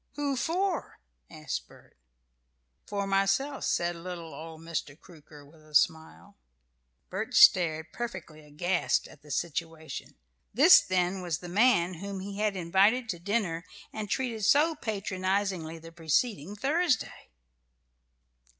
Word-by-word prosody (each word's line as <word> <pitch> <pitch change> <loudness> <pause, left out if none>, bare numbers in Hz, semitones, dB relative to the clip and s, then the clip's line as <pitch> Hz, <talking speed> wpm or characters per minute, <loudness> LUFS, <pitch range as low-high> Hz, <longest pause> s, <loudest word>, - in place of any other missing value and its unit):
"Who 285 -2 -1
for?" 350 +6 -2 0.3
asked - - -5
Bert. - - -20 0.9
"For 200 -1 -2
myself," 195 +9 +1
said 175 0 0
little 170 -2 -7
old 160 +2 -9
Mr. 165 -2 -5
Crooker, 150 -4 -15
with 155 +2 -20
a 155 -1 -12
smile. 160 +2 0 0.7
Bert 220 +7 -4
stared, 170 - +5
perfectly 180 -10 -6
aghast 175 +5 0
at 145 - -17
the 150 - -17
situation. 160 -1 -4 0.4
This, 300 +9 +8
then, 185 0 0
was 175 -4 -2
the 175 - -9
man 185 -3 +3
whom 200 0 -5
he 200 +1 -7
had 210 -2 +1
invited 195 +7 +2
to 175 - -3
dinner, 180 -3 -1 0.3
and 215 -2 -5
treated 240 -4 -2
so 300 +9 +4
patronizingly 195 - -2
the 165 +1 -12
preceding 170 - -1
Thursday! 290 - 0
185 Hz, 125 wpm, -29 LUFS, 165-220 Hz, 0.9 s, This